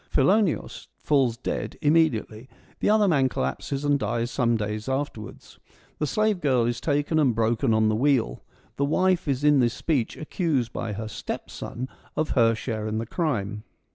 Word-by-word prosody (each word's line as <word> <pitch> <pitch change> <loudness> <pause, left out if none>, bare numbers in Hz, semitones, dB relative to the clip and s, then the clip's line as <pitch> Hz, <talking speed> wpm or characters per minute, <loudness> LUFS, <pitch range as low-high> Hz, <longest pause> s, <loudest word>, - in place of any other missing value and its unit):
Philoneos 185 +5 +1
falls 130 -6 +1
dead 125 - -4
im 150 +1 +3
mediately; 130 -7 +1 0.3
the - - +1
other 210 -1 +4
man 140 -7 +3
collapses, 135 - -3
and 145 -1 +2
dies 120 +2 -1
some 120 -3 +1
days 105 +2 -4
afterwards. 130 -5 -5 0.4
The 150 - 0
slave 215 +1 +1
girl 130 -6 +2
is 120 0 -2
taken 145 +1 +1
and 130 -7 +3
broken 115 +3 +1
on 110 0 +3
the 110 - +2
wheel; 125 - +1 0.4
the 140 - +1
wife 185 +3 +1
is 140 0 -1
in 150 -1 +5
this 120 -2 +2
speech 140 -9 -1
accused 150 - -1
by 115 -3 -3
her 110 +2 -5
stepson 120 +3 -6 0.3
of 155 0 -1
her 115 -2 +4
share 110 -2 -4
in 110 0 -2
the 115 - -2
crime. 110 - -2
130 Hz, 170 wpm, -25 LUFS, 115-150 Hz, 0.4 s, in